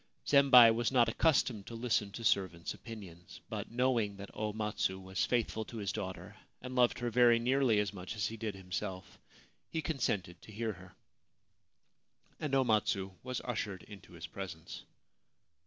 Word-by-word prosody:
Zembei 130 -5 +8
was 120 +2 0
not 120 -3 +4
accustomed 120 -6 +1
to 115 - -7
listen 115 -3 0
to 115 - -7
servants' 95 -6 0
opinions; 95 -7 -11
but, - - -5
knowing 120 -5 +1
that 100 0 -9
O 105 0 -2
Matsu 105 -3 -2
was 95 0 -2
faithful 115 -2 0
to 115 - -9
his 100 -3 -2
daughter 95 -2 -6 0.2
and 125 0 -7
loved 125 -1 +3
her 120 -1 -2
very 120 0 +6
nearly 125 -2 +2
as 105 0 -1
much 95 +2 -7
as 105 -2 -1
he 115 - -3
did 110 -2 -4
himself, 95 0 -6 0.5
he 165 - -2
consented 105 - -2
to - - -13
hear 110 +1 -2
her, 95 -1 -15 1.4
and 145 -3 -1
O 135 - +4
Matsu 105 -4 +1
was 125 0 -4
ushered 105 -6 -3
into 100 -4 -13
his 85 -1 -8
presence. 85 -1 -8
110 Hz, 165 wpm, -33 LUFS, 95-120 Hz, 1.4 s, Zembei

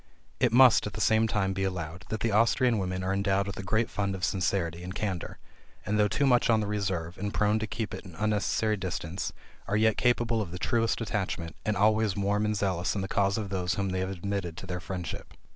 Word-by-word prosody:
It - - +3
must, 125 -2 +6
at - - -7
the - - -6
same 110 +1 +3
time 95 -3 0
be 95 0 -2
allowed, 90 -1 -4
that 110 -1 -3
the 115 - +1
Austrian 115 +2 +3
women 90 -1 -2
are 95 +1 0
endowed 100 0 +1
with 100 -1 -6
a - - -2
great 110 +4 +1
fund 100 -1 -2
of 95 - -7
sincerity 85 -3 -1
and 90 +2 -7
candor; 95 -6 -3 0.5
and, 105 +2 0
though 105 - +5
too 140 +7 +1
much 125 -2 +4
on 115 -1 +5
the 105 - -1
reserve, 95 -5 -2
and 100 +1 -2
prone 105 +1 +2
to 110 - -3
keep 110 0 -4
at - - -6
an 90 -5 -12
unnecessary 105 +1 +1
distance, 90 -1 -4 0.4
are 105 - +1
yet 110 0 +3
capable 120 -2 +2
of 100 - -4
the 90 - -6
truest 115 +4 0
attachment, 95 -6 -3
and 105 - +1
always 110 0 +3
warm 100 +1 +1
and 105 0 0
zealous 95 -2 0
in 100 - -1
the 95 - -3
cause 100 +1 +1
of 105 -3 -3
those 90 -2 -1
whom 100 -1 -1
they 95 0 -1
have 95 0 -1
admitted 95 -2 -3
to - - -7
their 90 -1 -4
friendship. 90 -2 -6
100 Hz, 235 wpm, -28 LUFS, 95-110 Hz, 0.5 s, must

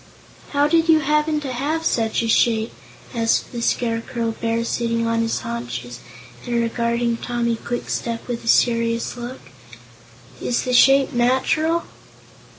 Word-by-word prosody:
"How 285 0 +2
did 330 +1 +2
you 315 -1 +6
happen 300 +1 +1
to 270 -3 -4
have 305 +6 -2
such 225 0 +1
a - - -1
shape?" 225 0 +2 0.4
asked 230 -2 +1
the 240 - -5
Scarecrow 230 0 -1
Bear, 230 +1 -2
sitting 230 0 -1
on 230 0 0
his 225 0 -1
haunches 120 +1 -5 0.4
and 240 - -3
regarding 235 0 0
Tommy 235 -1 -1
Kwikstep 235 0 -4
with 240 -1 -4
a - - -10
serious 230 0 +2
look. 245 +2 -7 1.0
"Is 240 - 0
the 250 - -2
shape 270 +2 +5
natural?" 265 +7 +2
235 Hz, 140 wpm, -21 LUFS, 230-260 Hz, 1.0 s, you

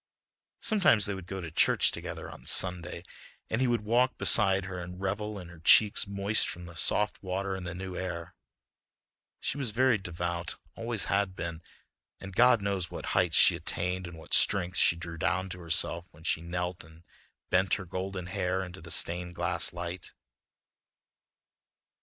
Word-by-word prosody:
Sometimes 190 - +4
they 100 - 0
would 95 -2 -8
go 95 0 -5
to 85 -2 -7
church - - +4
together - - -6
on - - -11
Sunday 90 -2 -1 0.5
and 110 - 0
he 130 - +3
would 120 -2 +1
walk 125 +4 +2
beside 95 -4 +4
her 95 -1 -6
and 90 +1 -8
revel 105 +2 -3
in 90 -3 -9
her 85 -2 -13
cheeks 100 +6 +5
moist 100 +2 +2
from 90 0 -7
the 90 - -11
soft 105 +6 +1
water 95 +1 -3
in 95 -1 -6
the 90 0 -5
new 95 0 -6
air. 85 -2 -5 1.1
She 145 - -2
was 130 -4 -1
very 120 +1 +2
devout, 85 -1 -4 0.2
always 115 -2 0
had 100 -2 0
been, 85 -1 -5 0.6
and 95 -1 -9
God 120 -2 +5
knows 95 -4 -1
what - - -7
heights - - +3
she - - +7
attained 90 +1 -2
and 90 -2 -10
what 80 - -9
strength 90 -1 +3
she 85 - +5
drew 85 -1 -8
down 95 +2 0
to 90 0 -7
herself 85 +1 +1
when 80 -1 -18
she 80 - 0
knelt 90 +1 -4
and 80 +2 -17 0.5
bent 95 0 +3
her 95 - -6
golden 95 +1 -5
hair 90 +1 -1
into 90 0 -10
the 85 - -11
stained 90 +1 -1
glass - - 0
light. 85 +1 -6
90 Hz, 175 wpm, -29 LUFS, 85-100 Hz, 1.1 s, she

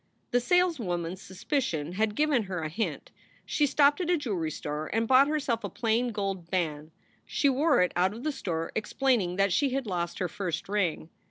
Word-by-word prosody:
The 245 - +4
saleswoman 245 - +1
s 185 +1 -9
suspicions 180 - -2
had 215 +1 0
given 295 -6 +2
her 180 -4 -4
a 155 - -2
hint. 220 +8 -3 0.3
She 295 - +1
stopped 285 +4 +4
at 350 - -2
a 355 - +4
jewelry 200 - -2
store 150 0 -4
and 225 +1 0
bought 265 +3 +6
herself 280 -7 -1
a 200 - -3
plain 235 +4 0
gold 195 -5 -3
band. 155 -5 -2 0.3
She 285 - +1
wore 280 - +3
it 180 - 0
out 185 +4 +2
of 235 - -9
the 305 - 0
store, 165 - -3
explaining 220 -4 0
that 195 -1 +2
she 285 - +2
had 270 -2 -1
lost 175 -4 -3
her 180 - -1
first 170 -2 -4
ring. 185 -5 -1
210 Hz, 195 wpm, -28 LUFS, 175-270 Hz, 0.3 s, bought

